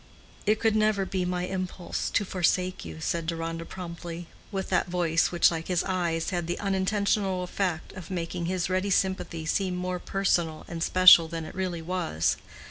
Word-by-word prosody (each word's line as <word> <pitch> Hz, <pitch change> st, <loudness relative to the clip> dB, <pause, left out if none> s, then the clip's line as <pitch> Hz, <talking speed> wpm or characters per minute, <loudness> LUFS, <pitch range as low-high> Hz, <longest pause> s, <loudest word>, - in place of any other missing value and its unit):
"It 215 Hz, +1 st, +3 dB
could 220 Hz, -1 st, +2 dB
never 215 Hz, -2 st, +2 dB
be 185 Hz, -1 st, -1 dB
my 180 Hz, 0 st, -1 dB
impulse 185 Hz, -1 st, -3 dB
to 205 Hz, -, +1 dB
forsake 185 Hz, 0 st, 0 dB
you," 80 Hz, -1 st, -8 dB
said 165 Hz, -, -1 dB
Deronda 165 Hz, 0 st, -3 dB
promptly, 170 Hz, -1 st, -7 dB, 0.3 s
with 195 Hz, -2 st, -3 dB
that -, -, +2 dB
voice 170 Hz, -2 st, +2 dB
which, 175 Hz, 0 st, +4 dB
like 165 Hz, -1 st, -4 dB
his 180 Hz, -2 st, +1 dB
eyes, 175 Hz, -3 st, -1 dB
had 175 Hz, -2 st, -2 dB
the 175 Hz, -, -2 dB
unintentional 195 Hz, -1 st, 0 dB
effect 180 Hz, -3 st, -2 dB
of 185 Hz, -4 st, -9 dB
making 170 Hz, -1 st, -3 dB
his 180 Hz, -1 st, 0 dB
ready 185 Hz, +2 st, 0 dB
sympathy 190 Hz, -4 st, 0 dB
seem 185 Hz, +3 st, 0 dB
more 180 Hz, 0 st, -2 dB
personal 175 Hz, -5 st, 0 dB
and 170 Hz, -1 st, -6 dB
special 180 Hz, -1 st, +8 dB
than 165 Hz, -1 st, -5 dB
it -, -, -9 dB
really 180 Hz, -3 st, -3 dB
was. 160 Hz, -, 0 dB
180 Hz, 175 wpm, -27 LUFS, 170-190 Hz, 0.3 s, special